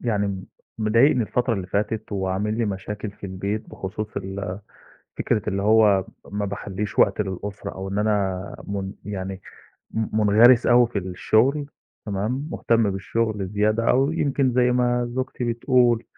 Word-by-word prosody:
يعني، 100 -5 -1 0.3
مضايقني 115 +5 +4
الفترة 120 +2 0
اللي 95 -3 -4
فاتت 105 +3 -2
وعامل 100 +3 -1
لي 115 - +2
مشاكل 105 +1 -4
في 100 - -9
البيت 100 +3 -4
بخصوص 105 +3 -6
ال 95 0 -4 0.6
فكرة 105 - +1
اللي 100 -1 -1
هو 105 -2 +4 0.2
ما 105 +1 -2
باخلّيش 100 +1 -5
وقت 100 +1 +4
للأسرة 100 0 -4
أو 95 0 -6
إن 100 +1 -2
أنا 100 -3 0
من 100 -1 -3
يعني، 95 -2 -5 0.5
م 110 -1 -2
مُنغرِس 115 +4 +6
أوي 120 0 +6
في 115 -3 -3
الشغل، 110 +10 +1 0.4
تمام، 110 +9 -2
مُهتم 115 -8 +2
بالشغل 105 0 -2
زيادة 105 +3 +1
أوي. 135 +5 +2
يمكن 135 -2 +1
زي 125 0 +3
ما 120 -1 +1
زوجتي 130 0 -3
بتقول 120 0 +2
105 Hz, 145 wpm, -23 LUFS, 100-120 Hz, 0.6 s, مُنغرِس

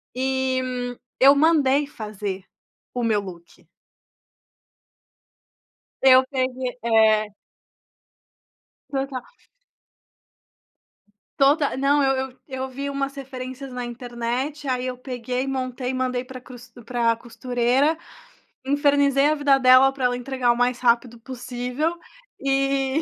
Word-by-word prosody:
E 260 0 0 0.6
eu 275 +2 +8
mandei 290 -2 +3
fazer 210 -6 -6 0.5
o 245 - -2
meu 220 -2 +2
look. 180 -2 -12 2.4
Eu 260 -1 +7
peguei 255 -2 -2
é. 220 -2 +3 1.6
Total. 270 -2 -3 2.2
Total. 285 +1 +3
Não, 280 +2 +3
eu 265 -1 +1
eu 255 - -25
eu 260 -1 -4
vi 275 +2 -5
umas 275 0 -3
referências 260 0 -7
na 250 0 -4
internet, 245 +4 -4
aí 255 0 -1
eu 255 -1 -4
peguei, 250 0 -4
montei 255 -1 -3
e - - -3
mandei 255 -1 -1
para 255 0 -9
cruztu 245 -1 -14
para 235 -1 +1
costureira, 250 +5 0 0.7
infernizei 285 0 +3
a 305 - +2
vida 285 -2 +3
dela 255 +1 +7
para 270 -1 -3
ela 245 0 +1
entregar 250 -1 0
o 240 - -1
mais 245 0 +1
rápido 235 -1 +1
possível, 250 +5 -3 0.4
e 275 +1 +1
255 Hz, 110 wpm, -23 LUFS, 245-275 Hz, 2.4 s, eu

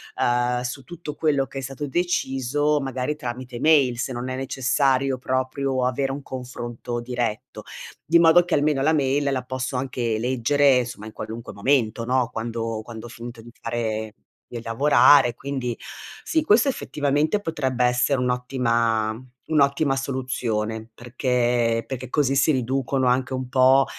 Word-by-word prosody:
uhm, 125 0 +1
su 125 +2 -5
tutto 160 0 -8
quello 145 -4 +1
che 135 - -9
è 135 - -2
stato 135 +3 -5
deciso 145 -3 0
magari 135 +1 -2
tramite 125 -3 -6
mail, 140 -5 +4
se 130 - -2
non 125 +1 -4
è 130 - -3
necessario 135 0 +1
proprio 130 +1 -1
avere 135 +2 0
un 140 - -5
confronto 120 -2 -6
diretto, 120 -3 -4 0.4
di 170 +2 +5
modo 170 +1 +6
che 180 - -3
almeno 145 -2 +1
la 155 +3 +3
mail 140 -1 +1
la 130 -2 -1
posso 130 +1 -4
anche 125 -4 -1
leggere, 130 +2 +3
somma, 115 -3 -8
in 110 - -10
qualunque 115 +2 -7
momento, 115 0 +1
no, 125 -1 +1
quando 115 -1 -3
quando 115 0 -9
ho - - -12
finito 120 -1 -9
di 120 +1 -13
fare 110 -2 -3 0.4
di 120 -1 -6
lavorare. 120 +1 +5
Quindi, 130 -4 -4 0.5
sì, 320 - +1
questo 230 +2 +4
effettivamente 150 - 0
potrebbe 130 -8 -1
essere 125 +2 +2
un'ottima 120 -3 0 0.4
un'ottima 140 -1 +2
soluzione 115 -5 -3
perché 120 -2 0
perché 130 -1 -6
così 140 -1 +1
si 140 +3 +4
riducono 130 0 0
anche 130 +1 +1
un 130 0 -3
po', 130 +1 +5
130 Hz, 150 wpm, -23 LUFS, 120-140 Hz, 0.5 s, modo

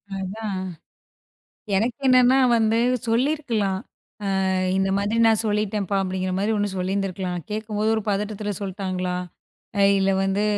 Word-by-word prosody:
அதான். 195 0 -4 1.1
எனக்கு 230 +4 0
என்னன்னா 255 +1 +6 0.2
வந்து 220 0 +2 0.3
சொல்லியிருக்கலாம். 230 -6 0 0.7
அ - - +1 0.3
"இந்த 195 0 +1
மாதிரி 205 +3 0
நான் 220 -1 +4
சொல்லிட்டேன்ப்பா!" 205 -2 0
அப்டிங்கிற 185 0 -2
மாதிரி 210 +3 +1
ஒண்ணு 205 0 0
சொல்லிருந்துருக்கலாம். 185 -1 -2
நான் 170 - -7
கேக்கும்போது 215 0 -1
ஒரு 220 - -1
பதட்டத்துல 205 +1 -2
சொல்ட்டாங்களா? 185 -2 -3 0.6
அ - - +4 0.2
இல்ல 195 0 +2
வந்து, 195 +2 0
205 Hz, 125 wpm, -23 LUFS, 190-220 Hz, 1.1 s, என்னன்னா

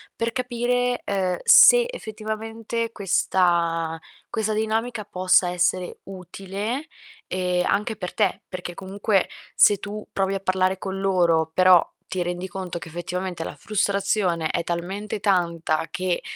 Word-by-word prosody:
per 230 0 -1
capire, 245 0 -1
uhm, 185 -3 0
se 485 -1 +8
effettivamente 225 - -5
questa 170 -5 +1 0.3
questa 220 -1 -1
dinamica 220 +1 -1
possa 185 -1 +3
essere 180 +1 -1
utile, 195 - -5 0.4
ehm, 180 -1 -1
anche 215 +2 0
per 180 - -5
te, 205 -4 0
perché 180 -1 -6
comunque 195 +1 0 0.3
se 205 - +6
tu 210 +1 -7
provi 195 0 0
a - - -2
parlare 185 0 +1
con 190 0 -5
loro, 170 -4 +2
però 185 -2 +6 0.2
ti 185 - -3
rendi 180 +1 -4
conto 180 -1 -5
che - - -9
effettivamente 175 +1 -4
la - - -7
frustrazione 195 -5 0
è 170 - -1
talmente 190 +5 -4
tanta 170 -5 0
che, 180 -1 -1
190 Hz, 130 wpm, -24 LUFS, 180-215 Hz, 0.4 s, se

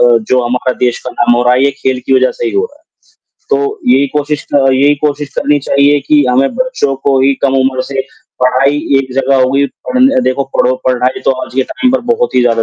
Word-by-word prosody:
अ, - - +5
जो 130 0 +3
हमारा 125 +1 -1
देश 120 - -1
का - - -4
नाम 120 0 +2
हो 120 - +1
रहा 125 0 +3
है, 130 - +2
ये 140 - +2
खेल 130 -1 0
की 135 - +2
वज़ह 130 - +2
से - - 0
ही - - -3
हो 400 +3 +1
रहा 295 -9 -17
है, 320 - -36 0.8
तो 420 +1 -5
यही 140 +1 +3
कोशिश 150 0 -2
क 135 -1 +3
यही 140 +3 +3
कोशिश 145 0 -3
करनी 150 0 +1
चाहिए 140 +1 +3
कि 150 -1 +4
हमें 135 - +1
बच्चों 255 - -1
को 135 -2 +2
ही 135 +1 +3
कम 135 -1 +1
उम्र 130 0 0
से 135 - -1 0.4
पढ़ाई 130 +3 +2 0.2
एक 130 -1 -4
जगह 135 0 +1
हो 130 - +1
गई, 140 +1 +2
पढ़ने 260 - 0
देखो 135 +2 0
पढ़ो 125 +1 +2
पढ़ाई 125 0 0
तो - - +3
आज - - -15
के 130 - +2
टाइम 255 - -1
पर 265 - +1
बहुत 240 - -2
ही 125 - +4
ज़्यादा 115 -2 +1
135 Hz, 240 wpm, -12 LUFS, 130-145 Hz, 0.8 s, अ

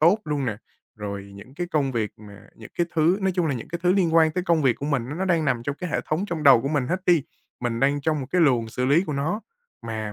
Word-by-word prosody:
tốt 175 +7 +5
luôn 145 -4 -2
nè, 105 -3 -2 0.4
rồi 100 -1 -6
những 125 +7 -13
cái 175 +2 -3
công 145 -6 0
việc 110 -3 -1
mà 105 -1 -13
những 110 - -13
cái 175 - +2
thứ 165 +4 +3
nói 190 -1 +1
chung 175 -3 +1
là, 140 - 0
những 120 - -7
cái 170 - -4
thứ 180 +1 +4
liên 175 -4 +2
quan 160 -1 +5
tới 180 +2 -3
công 165 -4 +2
việc 130 -3 +3
của 140 - -5
mình 135 -5 -1
á 145 - -5
nó 190 - 0
đang 170 -4 +1
nằm 125 -5 0
trong 140 +3 -3
cái 180 -3 -5
hệ - - 0
thống 155 +5 -1
trong 165 -4 -4
đầu 135 -5 +7
của 135 - -1
mình 145 -4 0
hết 185 +7 -1
đi. 170 -4 +4 0.4
Mình 120 -1 -2
đang 140 +1 +2
trong 155 0 0
một 130 - -5
cái 180 - +2
luồng 120 -7 +3
xử 125 +3 -3
lý 150 +8 +3
của 150 - -4
nó 160 +10 -1 0.5
mà 110 -2 -4
145 Hz, 295 wpm, -24 LUFS, 120-170 Hz, 0.5 s, đầu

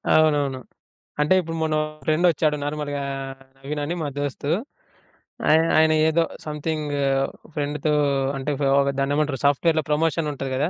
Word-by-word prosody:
అవునవును. 145 -4 +3 0.6
అంటే 150 +5 +3
ఇప్పుడు 165 -1 -6
మొన్న 155 -1 0
మా - - -1 0.2
ఫ్రెండ్ 155 +3 +2
వచ్చాడు 155 -2 +1
నార్మల్‌గా, 145 -1 -3 0.6
నవీన్ 145 +2 -5
అని 165 +4 -2
మా 155 - -1
దోస్తు. 145 0 -3 1.0
ఆయన 160 +1 +6 0.2
ఆయన 160 0 +4 0.2
ఏదో 165 +1 +3 0.2
సమ్‌థింగ్ 150 0 -3 0.6
ఫ్రెండ్‌తో 150 +1 -1 0.4
అంటే 135 +2 -2 0.3
ఒక 140 - +1
దాన్నేమంటారు? 145 -1 0
సాఫ్ట్‌వేర్‌లో 155 +3 +3
ప్రమోషన్ 160 +1 +1
ఉంటది 135 -1 -5
కదా! 145 +5 0
150 Hz, 135 wpm, -23 LUFS, 145-155 Hz, 1.0 s, ఆయన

